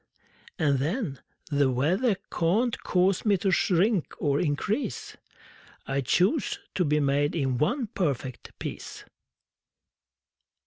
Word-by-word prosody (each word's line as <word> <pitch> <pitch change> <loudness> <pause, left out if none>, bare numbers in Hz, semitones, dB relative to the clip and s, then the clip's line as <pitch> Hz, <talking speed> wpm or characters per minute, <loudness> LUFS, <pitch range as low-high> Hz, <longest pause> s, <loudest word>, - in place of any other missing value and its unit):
And, 145 -6 +2
then, 155 - -2 0.3
The 140 -2 +3
weather 180 - +2 0.2
can't 215 +9 +1
cause 185 +1 +2
me 205 -3 +3
to 190 +2 0
shrink 185 +1 +2
or 145 -2 +1
increase: 190 - -2 0.7
I 135 0 -1
chose 190 - +1 0.2
to 185 - +1
be 150 -1 +2
made 145 +1 +1
in 135 -6 0
one 245 - +1
perfect 140 - -3
piece! - - -7
165 Hz, 115 wpm, -27 LUFS, 140-200 Hz, 0.7 s, The